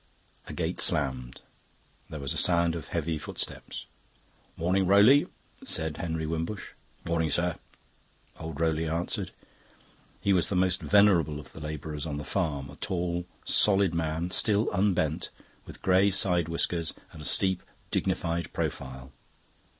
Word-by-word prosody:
A - - -7
gate - - -2
slammed; 65 -3 0 0.7
there 75 - -6
was 70 -1 -1
a - - -7
sound 85 -1 +3
of 80 -3 -6
heavy 80 -1 -2
footsteps. - - -5 0.7
"Morning, 90 +3 +1
Rowley!" 105 +9 +6 0.4
said 80 -2 +1
Henry 80 -1 -3
Wimbush. 80 +6 -3 0.4
"Morning, 80 -1 0
sir," 85 +3 +1 0.8
old 80 -2 -6
Rowley 80 0 +1
answered. 85 +2 -2 0.9
He 100 - +2
was 90 -3 +3
the 100 - -1
most 90 0 +2
venerable 90 -8 +4
of 75 - -13
the - - -10
labourers 75 0 -5
on 75 -2 -3
the 75 - -5
farm 70 -8 -2
a 70 - -13
tall, 90 -2 -2 0.2
solid 100 -4 +4
man, 85 +1 -2
still 105 +3 +2
unbent, 90 -6 +1 0.4
with - - -11
grey 95 +2 +4
side 90 -4 +2
whiskers 85 0 -1 0.2
and 80 - -11
a - - -8
steep, 95 +1 +3 0.3
dignified 85 +1 -1
profile. 65 0 -4
85 Hz, 140 wpm, -28 LUFS, 80-95 Hz, 0.9 s, Rowley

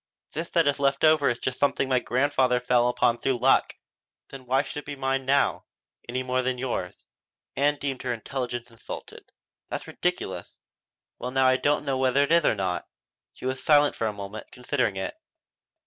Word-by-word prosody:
This 165 +2 -4
that 165 -2 +3
is 140 -1 +1
left 140 -1 +1
over 155 -3 +5
is 120 - -1
just 130 +1 -4
something 140 -1 +2
my 130 -1 +3
grandfather 130 -1 +2
fell 125 -1 +3
upon 120 -1 +2
through 135 -2 0
luck. - - +3 0.5
Then 130 -2 -11
why 135 +2 +3
should - - -8
it - - -11
be 145 0 -5
mine 135 -1 -1
now 140 +1 +2 0.4
any 130 +1 -2
more 130 0 0
than 130 0 -1
yours?" 120 -8 -3 0.6
Ann 145 +1 +2
deemed 135 -2 -4
her 125 - -2
intelligence 120 0 -4
insulted. 115 - -10 0.4
"That's - - -4
ridiculous." - - -3 0.6
"Well 125 - -3
now 135 +1 +2
I 130 0 +5
don't 145 +2 +1
know 135 -2 0
whether 130 +1 +3
it 145 - -2
is 170 -1 +5
or - - +3
not." 90 -4 -2 0.5
She - - -11
was 130 0 -2
silent 145 -1 +5
for 115 - -1
a - - 0
moment, 100 +1 -8
considering 125 -4 -1
it. 95 0 -3
130 Hz, 190 wpm, -26 LUFS, 125-140 Hz, 0.6 s, over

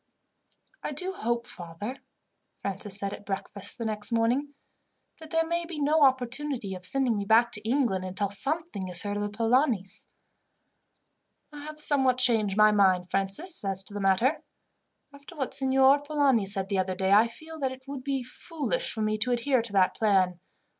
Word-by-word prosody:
"I - - -4
do 365 +7 -2
hope, 235 - -2
father," 190 +7 -7 0.6
Francis 200 0 -4
said 200 -1 -3
at - - -9
breakfast 200 0 -4
the 230 - -4
next 215 0 -2
morning, 245 +6 0 0.6
"that 320 -1 -12
there 325 +1 +1
may 340 +1 -1
be 335 -2 -7
no 300 +2 +2
opportunity 260 -4 +1
of 185 -1 -8
sending 255 +2 +1
me 205 - -2
back 225 +3 +4
to 210 - -1
England, 240 -8 +1
until 190 +2 -3
something 275 - -2
is 180 -1 0
heard 205 0 -3
of - - -2
the 205 - -2
Polanis." 225 - 0 1.5
"I 295 - -9
have 305 0 -9
somewhat 265 -4 +2
changed 220 -6 +3
my 215 0 +6
mind, 185 -3 +2
Francis, 195 - 0
as 195 -1 +2
to 200 - -13
that 205 - -4
matter. 225 - +2 0.7
After 285 +5 -14
what 270 -4 -3
Signor 270 +1 +4
Polani 285 -8 +1
said 195 -1 0
the 195 -2 0
other 185 0 -1
day, 190 +1 0
I 215 +3 +6
feel 315 +7 -11
that 265 -2 -1
it 260 0 -11
would 275 -2 -6
be 270 -2 -2
foolish 330 - -3
for 220 - -3
me 215 0 -1
to 250 +3 +1
adhere 245 +1 +1
to 225 -3 -8
that 190 -2 +3
plan. 190 -5 +2
230 Hz, 180 wpm, -27 LUFS, 200-280 Hz, 1.5 s, my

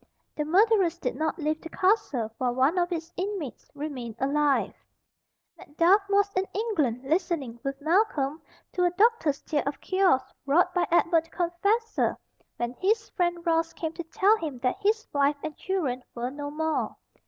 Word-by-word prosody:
The 300 - -2
murderers 380 0 +3
did - - -3
not 315 +1 -1
leave 310 -1 -1
the 330 - -8
castle 315 - +1
while 245 -1 0
one 275 +8 +3
of 350 0 0
its 330 0 -4
inmates 370 - -4
remained 270 -6 -5
alive. 285 +2 +1 0.9
Macduff 340 +7 +3
was 400 0 +2
in 375 +1 0
England 310 - 0
listening, 295 -5 -1
with 275 -1 -3
Malcolm, 315 -4 +1 0.3
to 360 - +1
a 355 - +4
doctor's 360 - +2
tale 295 -2 0
of 280 - -3
cures 370 -9 +2 0.2
wrought 315 +6 +3
by 360 - +1
Edward 335 -1 +3
the - - -22
Confessor 400 +7 0 0.4
when 240 0 -2
his 430 +3 +1
friend 345 -1 -1
Ross 330 -1 +1
came 320 -1 -4
to 340 - -6
tell 395 +6 +3
him 305 -9 -5
that 260 +10 0
his 435 +2 +1
wife 285 0 +2
and 310 -2 -4
children 300 -10 -2
were 245 +1 -3
no 285 +1 -5
more. 315 +1 -1
330 Hz, 165 wpm, -27 LUFS, 285-375 Hz, 0.9 s, a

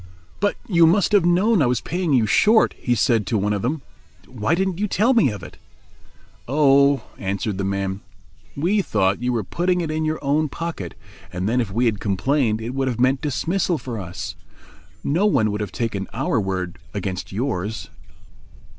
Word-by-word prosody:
"But 205 +1 +1
you 170 -5 +5
must 180 +2 +3
have 200 -5 +4
known 185 +3 +3
I 135 - +4
was 125 -2 +1
paying 175 -1 -2
you 125 -5 +4
short," 215 - +4
he 120 - -1
said 110 -2 +2
to 115 - +1
one 105 +1 0
of 100 - -2
them. 135 +5 -2 0.4
"Why 120 +3 0
didn't 190 0 -1
you 210 - 0
tell 220 +6 +2
me 230 - +4
of 105 -5 -7
it?" - - -11 0.9
"Oh," 140 0 +4 0.2
answered 100 +1 -2
the - - -1
man, 100 0 -2 0.6
"we 185 +8 +2
thought 100 - 0
you 125 0 0
were 115 -3 -1
putting 180 - 0
it 165 -3 -2
in 155 0 -1
your 155 0 0
own 150 +2 +1
pocket 165 - -5 0.4
and 90 +2 -3
then 125 +3 +2
if 105 -5 -4
we 120 +5 +1
had 110 -3 +1
complained 110 +3 0
it 115 +3 -4
would 135 0 -1
have 120 -2 -2
meant 130 +2 +2
dismissal 170 +5 0
for 120 -6 -6
us. 90 -2 -6 0.7
No 175 +9 +2
one 110 - +2
would 105 +1 -3
have 105 -3 -4
taken 105 -5 -3
our 120 -1 0
word 95 -2 -3 0.2
against 90 -2 -4
yours." 110 -2 -3
125 Hz, 190 wpm, -22 LUFS, 105-165 Hz, 0.9 s, you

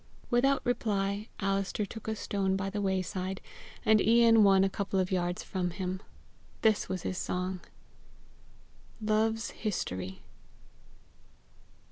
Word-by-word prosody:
Without 270 +3 +3
reply, 205 -3 0
Alister 195 +1 0
took 220 +2 -9
a 220 - -1
stone 195 -2 -1
by 195 0 -2
the 205 0 -2
wayside, 190 0 -1 0.5
and 220 -1 +5
Ian 230 0 +6
one 195 -1 +6
a - - +4
couple 195 0 -1
of 185 0 0
yards 175 -1 -1
from 180 -2 -2
him. 185 +1 -4 0.6
This 220 -4 +3
was 185 -2 -3
his 185 - -2
song. 185 0 -2 1.4
LOVE'S 220 +1 +1
HISTORY. 95 - -4
195 Hz, 120 wpm, -30 LUFS, 185-220 Hz, 1.4 s, Ian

